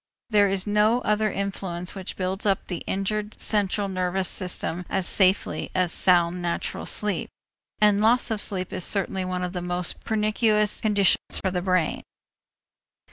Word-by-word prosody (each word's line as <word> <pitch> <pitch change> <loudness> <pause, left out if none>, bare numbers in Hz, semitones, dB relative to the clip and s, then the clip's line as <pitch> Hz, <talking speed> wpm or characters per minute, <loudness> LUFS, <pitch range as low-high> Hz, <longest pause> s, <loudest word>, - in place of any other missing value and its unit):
There 205 -2 +4
is 190 -1 +1
no 210 +3 +2
other 215 -1 0
influence 190 -3 -4
which 190 -2 -7
builds 190 +1 -3
up 195 -2 0
the 175 -3 -5
injured 210 +2 -3
central 205 -1 0
nervous 185 0 -1
system 180 -2 0
as 190 -2 -1
safely 190 +1 +1
as 180 -2 +2
sound 175 -1 +2
natural 170 -1 -3
sleep, 210 -4 +1 0.5
and 210 -1 +4
loss 230 +2 +3
of 215 -2 0
sleep 185 -2 +2
is 185 - -1
certainly 190 -1 -1
one 180 0 -3
of 180 0 -4
the 180 - -4
most 180 0 -2
pernicious 215 -1 +1
conditions 205 -3 +2
for 190 - -2
the 180 -1 -2
brain. 180 -3 0
195 Hz, 155 wpm, -24 LUFS, 180-210 Hz, 0.5 s, There